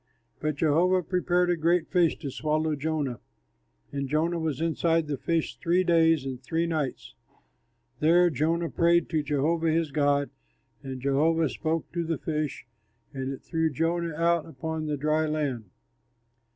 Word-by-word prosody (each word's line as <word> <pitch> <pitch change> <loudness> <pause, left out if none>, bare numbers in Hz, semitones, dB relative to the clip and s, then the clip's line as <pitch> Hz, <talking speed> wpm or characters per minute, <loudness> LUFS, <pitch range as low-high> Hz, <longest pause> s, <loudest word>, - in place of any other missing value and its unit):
But 155 -1 -1
Jehovah 170 +5 +2
prepared 180 0 +1
a - - +2
great 170 +1 +1
fish 175 -3 +2
to 140 - -4
swallow 155 +2 0
Jonah, 145 -5 -2 0.7
and 140 -1 -3
Jonah 165 +4 +1
was 155 -4 -2
inside 165 0 +1
the 150 -1 -2
fish 165 +4 -2
three 180 0 +2
days 165 -4 +3
and 130 -2 -5
three 165 +6 -1
nights. 145 - -3 0.9
There 175 +3 +4
Jonah 165 +4 0
prayed 170 0 +3
to 160 -3 +1
Jehovah 155 +3 0
his 160 -1 0
God; 145 -2 +1 0.5
and 135 -2 -6
Jehovah 155 +3 +2
spoke 160 +2 -3
to 170 0 -2
the 165 -1 -2
fish, 150 -3 -3 0.5
and 135 0 -3
it 135 - -8
threw 160 -1 0
Jonah 165 +2 -1
out 170 0 +1
upon 160 +2 -4
the 150 -1 -1
dry 155 +2 +1
land. 140 -9 -2
160 Hz, 150 wpm, -27 LUFS, 145-165 Hz, 0.9 s, There